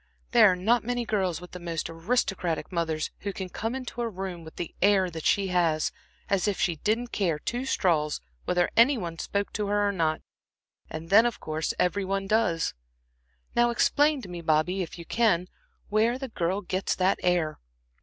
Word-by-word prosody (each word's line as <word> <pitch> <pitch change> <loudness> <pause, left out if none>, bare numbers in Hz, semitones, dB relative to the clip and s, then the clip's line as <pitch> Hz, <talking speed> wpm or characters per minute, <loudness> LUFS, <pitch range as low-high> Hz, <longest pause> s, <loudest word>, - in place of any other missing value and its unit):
There 225 -5 +7
are - - +1
not 220 +6 +2
many 245 +1 -2
girls 190 -7 0
with 180 0 -11
the 180 - -8
most 170 -2 -3
aristocratic 175 -1 -1
mothers 160 -3 -1
who 200 - -3
can 190 -1 -6
come 225 +6 -3
into 250 -2 -5
a 235 - -1
room 185 -4 -6
with 160 - -12
the 170 - -5
air 190 -2 +4
that 160 -1 -7
she 195 -2 +2
has, 165 -4 +2 0.4
as 195 +1 +1
if 205 - -1
she 170 -3 +1
didn't 225 +8 0
care 175 -7 0
two 240 +11 -3
straws 155 - +1 0.3
whether 180 0 +1
any 250 +4 +6
one 170 -5 -5
spoke 200 0 -2
to 210 -1 -2
her 205 0 +2
or - - +2
not, 160 -4 0 0.7
and 160 +2 -7
then 220 +4 +7
of 240 - -4
course 155 0 -2
every 190 +3 +1
one 195 +1 -1
does. 195 -6 +1 0.8
Now 240 0 +4
explain 285 +4 +2
to - - -7
me, 175 -1 -6
Bobby, 160 +4 +1
if 175 - -6
you 170 - -9
can, 185 -4 +2 0.4
where 225 +4 +2
the 265 0 -6
girl 185 -1 -1
gets 185 +1 -1
that 185 +1 +2
air." 175 -4 +1
190 Hz, 195 wpm, -27 LUFS, 170-220 Hz, 0.8 s, There